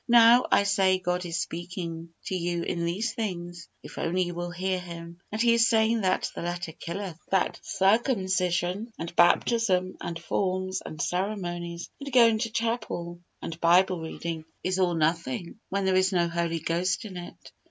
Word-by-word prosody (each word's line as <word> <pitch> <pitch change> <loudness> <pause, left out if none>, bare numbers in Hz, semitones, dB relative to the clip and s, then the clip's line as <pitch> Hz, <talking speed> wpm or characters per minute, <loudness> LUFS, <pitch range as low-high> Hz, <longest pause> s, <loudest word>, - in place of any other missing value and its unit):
Now, 235 +1 +7
I - - +5
say, 195 -2 +3
God 180 0 -2
is 170 0 -2
speaking 170 -1 -5 0.2
to - - -3
you 175 -1 -1
in 170 -1 -2
these 210 +7 -1
things, 175 -6 -5
if - - -9
only 180 +2 +1
you 175 0 -4
will 175 0 -4
hear 185 +1 -1
Him, 170 -1 -9
and 215 - -3
He 235 0 +5
is 230 0 +4
saying 225 0 +3
that 185 -1 +1
the - - -6
letter 175 0 -3
killeth, 170 +1 -6
that 190 -1 +1
circumcision, 190 -2 +1
and 170 +1 -6
baptism, 185 +1 +3
and 170 - -4
forms, 185 +2 -1
and 155 - -8
ceremonies, 175 -2 -2
and 280 -1 -6
going 230 -3 +6
to 230 0 -1
chapel, 220 -7 -2 0.2
and 165 0 -6
Bible 180 +1 +4
reading, 160 0 -5 0.2
is 185 +1 0
all 180 -2 +2
nothing, 165 - -1
when 200 0 -1
there 190 - +3
is 185 +1 +3
no 175 -2 +2
Holy 170 -1 -1
Ghost 175 +5 0
in 195 -3 -8
it. 175 -1 -9
180 Hz, 175 wpm, -27 LUFS, 170-200 Hz, 0.2 s, Now